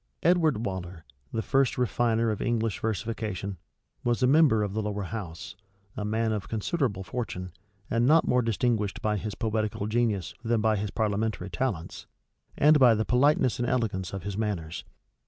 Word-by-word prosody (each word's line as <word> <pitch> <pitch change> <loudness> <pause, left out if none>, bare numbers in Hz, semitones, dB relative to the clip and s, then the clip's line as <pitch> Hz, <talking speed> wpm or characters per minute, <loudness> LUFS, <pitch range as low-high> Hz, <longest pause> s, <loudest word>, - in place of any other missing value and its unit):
Edward 160 -9 +3
Waller, 90 -3 -5 0.3
the 110 - -2
first 135 -1 +2
refiner 115 -2 +1
of 105 - -4
English 115 -3 0
versification, 110 -3 -3 0.5
was 120 +1 +1
a - - +6
member 135 -6 +5
of 100 -2 -3
the 110 - -1
lower 105 -1 -3
house; 100 -1 -6 0.4
a 105 - -3
man 110 +2 0
of 105 -3 -3
considerable 110 - -1
fortune, 90 -5 -5 0.4
and 115 +2 +1
not 160 +3 +5
more 125 0 +3
distinguished 115 -3 0
by 105 -1 +1
his 105 0 -4
poetical 110 -2 -1
genius 110 -5 0
than 115 -1 +1
by 110 0 +2
his 105 0 -2
parliamentary 105 -3 -1
talents, 95 -5 -3 0.5
and 150 +1 +6
by 125 -4 +7
the 110 +1 0
politeness 130 -1 +3
and 120 0 0
elegance 110 -8 -1
of 95 -3 -5
his 100 0 -4
manners. 95 -7 -3
110 Hz, 165 wpm, -27 LUFS, 100-120 Hz, 0.5 s, by